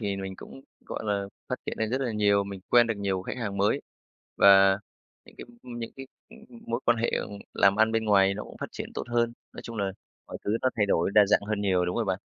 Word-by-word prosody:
thì 100 Hz, -3 st, -2 dB
mình 95 Hz, -1 st, -6 dB
cũng, 70 Hz, -6 st, -11 dB, 0.3 s
gọi -, -, -5 dB
là, 100 Hz, -2 st, -1 dB, 0.2 s
phát -, -, 0 dB
triển -, -, -3 dB
lên 110 Hz, -1 st, -1 dB
rất 130 Hz, +2 st, 0 dB
là 125 Hz, -4 st, -1 dB
nhiều, 100 Hz, -1 st, +2 dB
mình 100 Hz, -1 st, -7 dB
quen 120 Hz, -1 st, +6 dB
được 115 Hz, -, -1 dB
nhiều 95 Hz, -2 st, -1 dB
khách -, -, -5 dB
hàng 100 Hz, -4 st, -3 dB
mới 100 Hz, +1 st, +2 dB, 0.6 s
và 95 Hz, 0 st, +7 dB, 0.5 s
những -, -, -18 dB
cái -, -, -8 dB, 0.2 s
những 120 Hz, -2 st, -7 dB
cái, 135 Hz, 0 st, -8 dB, 0.2 s
ừ, -, -, -14 dB, 0.3 s
mối 115 Hz, +2 st, -2 dB
quan 120 Hz, -, +4 dB
hệ, 115 Hz, -, 0 dB
ừm, 100 Hz, -, -3 dB, 0.2 s
làm 100 Hz, 0 st, +4 dB
ăn 110 Hz, +1 st, +3 dB
bên 115 Hz, 0 st, 0 dB
ngoài 100 Hz, -2 st, +4 dB
nó 105 Hz, -, -5 dB
cũng -, -, -12 dB
phát -, -, -4 dB
triển -, -, -5 dB
tốt -, -, -3 dB
hơn. 120 Hz, 0 st, +1 dB, 0.2 s
Nói -, -, -8 dB
chung 115 Hz, -, -8 dB
là 100 Hz, -2 st, -1 dB, 0.4 s
mọi -, -, -8 dB
thứ 105 Hz, +2 st, +1 dB
nó 130 Hz, -, +4 dB
thay 105 Hz, -2 st, +2 dB
đổi 85 Hz, -2 st, +1 dB
đa 105 Hz, -1 st, +7 dB
dạng 105 Hz, -, +3 dB
hơn 105 Hz, -1 st, -1 dB
nhiều, 95 Hz, -3 st, +2 dB
đúng 90 Hz, -, -2 dB
rồi 115 Hz, -, +1 dB
bạn. 95 Hz, -2 st, -1 dB
105 Hz, 260 wpm, -27 LUFS, 100-115 Hz, 0.6 s, và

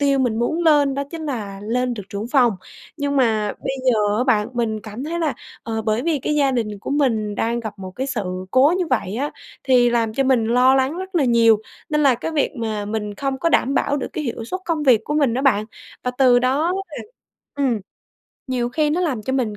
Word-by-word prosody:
tiêu 280 Hz, -1 st, +2 dB
mình 240 Hz, -4 st, +1 dB
muốn 240 Hz, +8 st, 0 dB
lên 290 Hz, -3 st, +4 dB
đó 280 Hz, -, -1 dB
chính 325 Hz, -2 st, -6 dB
là 205 Hz, -8 st, -5 dB
lên 245 Hz, +3 st, -1 dB
được 210 Hz, -, -6 dB
trưởng 205 Hz, +3 st, -5 dB
phòng, 250 Hz, -4 st, +4 dB, 0.4 s
nhưng 285 Hz, -1 st, -1 dB
mà 220 Hz, -5 st, +2 dB
bây 270 Hz, -, -3 dB
giờ 210 Hz, -4 st, +2 dB
á 250 Hz, -, +1 dB
bạn 220 Hz, -5 st, +2 dB
mình 225 Hz, -3 st, -1 dB
cảm 215 Hz, +5 st, -7 dB
thấy 335 Hz, +3 st, -3 dB
là, 305 Hz, -6 st, 0 dB, 0.3 s
ờ, 225 Hz, -1 st, -3 dB
bởi 220 Hz, +2 st, 0 dB
vì 320 Hz, -1 st, 0 dB
cái 300 Hz, -, -1 dB
gia 280 Hz, -2 st, +3 dB
đình 220 Hz, -5 st, -2 dB
của -, -, -7 dB
mình 225 Hz, -8 st, +1 dB
đang 235 Hz, +2 st, -1 dB
gặp 215 Hz, -3 st, -7 dB
một 185 Hz, -1 st, -7 dB
cái 265 Hz, +1 st, -2 dB
sự 245 Hz, -7 st, -2 dB, 0.3 s
cố 275 Hz, -, +4 dB
như 360 Hz, -, 0 dB
vậy 215 Hz, -, -1 dB
á 285 Hz, +4 st, -2 dB, 0.3 s
thì 245 Hz, -2 st, +4 dB
làm 230 Hz, -2 st, 0 dB
cho 270 Hz, -, +1 dB
mình 260 Hz, -4 st, +3 dB
lo 250 Hz, +3 st, +4 dB
lắng 270 Hz, +4 st, +1 dB
rất 375 Hz, +1 st, -7 dB
là 320 Hz, -5 st, +3 dB
nhiều, 235 Hz, -2 st, +4 dB, 0.4 s
nên 300 Hz, 0 st, +2 dB
là 275 Hz, -3 st, +5 dB
cái 245 Hz, +7 st, -4 dB
việc 300 Hz, -3 st, 0 dB
mà 215 Hz, -3 st, -3 dB
mình 210 Hz, -1 st, -4 dB
không 270 Hz, +3 st, -3 dB
có 335 Hz, -, +1 dB
đảm 275 Hz, -4 st, +2 dB
bảo 285 Hz, -, +1 dB
được -, -, -3 dB
cái 310 Hz, -, -3 dB
hiệu 230 Hz, -3 st, -4 dB
suất 370 Hz, +11 st, -4 dB
công 325 Hz, -3 st, -1 dB
việc 240 Hz, -6 st, +4 dB
của 295 Hz, -, -3 dB
mình 280 Hz, -6 st, +2 dB
á 260 Hz, -, -1 dB
bạn. 215 Hz, -7 st, +3 dB, 0.4 s
Và 250 Hz, -, 0 dB
từ 250 Hz, -2 st, +6 dB
đó 275 Hz, +8 st, +1 dB, 0.2 s
là 305 Hz, -, -9 dB, 0.6 s
ừm, 265 Hz, -6 st, 0 dB, 0.7 s
nhiều 245 Hz, -2 st, -1 dB
khi 300 Hz, +3 st, 0 dB
nó 340 Hz, -, 0 dB
làm 280 Hz, -11 st, -1 dB
cho 260 Hz, -, -3 dB
mình 235 Hz, -6 st, -1 dB
255 Hz, 240 wpm, -21 LUFS, 225-285 Hz, 0.7 s, từ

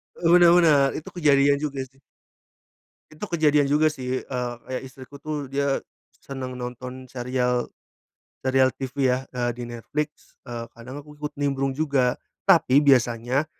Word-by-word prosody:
Eee, 170 Hz, -, 0 dB
bener 175 Hz, -1 st, +7 dB
bener. 150 Hz, -6 st, +5 dB
Itu 155 Hz, -, -8 dB
kejadian 140 Hz, -4 st, +4 dB
juga 145 Hz, -3 st, -3 dB
sih. 135 Hz, +1 st, -25 dB, 1.1 s
Itu 155 Hz, +6 st, -7 dB
kejadian 150 Hz, -5 st, +3 dB
juga 150 Hz, +3 st, +3 dB
sih, 130 Hz, -3 st, -3 dB
eee, 125 Hz, -2 st, -4 dB, 0.2 s
kayak 130 Hz, -, -3 dB
istriku 130 Hz, +1 st, -12 dB
tuh 145 Hz, -1 st, -5 dB
dia 140 Hz, 0 st, 0 dB, 0.4 s
senang 130 Hz, -2 st, -6 dB
nonton 125 Hz, +1 st, -7 dB
serial, 125 Hz, -1 st, -1 dB, 0.7 s
serial 130 Hz, 0 st, +3 dB
TV 135 Hz, 0 st, -1 dB
ya, 130 Hz, +1 st, -1 dB
eee, 120 Hz, -1 st, 0 dB
di -, -, -4 dB
Netflix. 145 Hz, +6 st, -6 dB
Eee, 115 Hz, -2 st, -6 dB
kadang 130 Hz, +5 st, -10 dB
aku 150 Hz, 0 st, -15 dB
ikut 150 Hz, 0 st, -5 dB
nimbrung 135 Hz, -1 st, -1 dB
juga 140 Hz, -4 st, +1 dB, 0.3 s
tapi 130 Hz, +2 st, +5 dB
biasanya, 125 Hz, 0 st, +2 dB
135 Hz, 145 wpm, -24 LUFS, 125-145 Hz, 1.1 s, bener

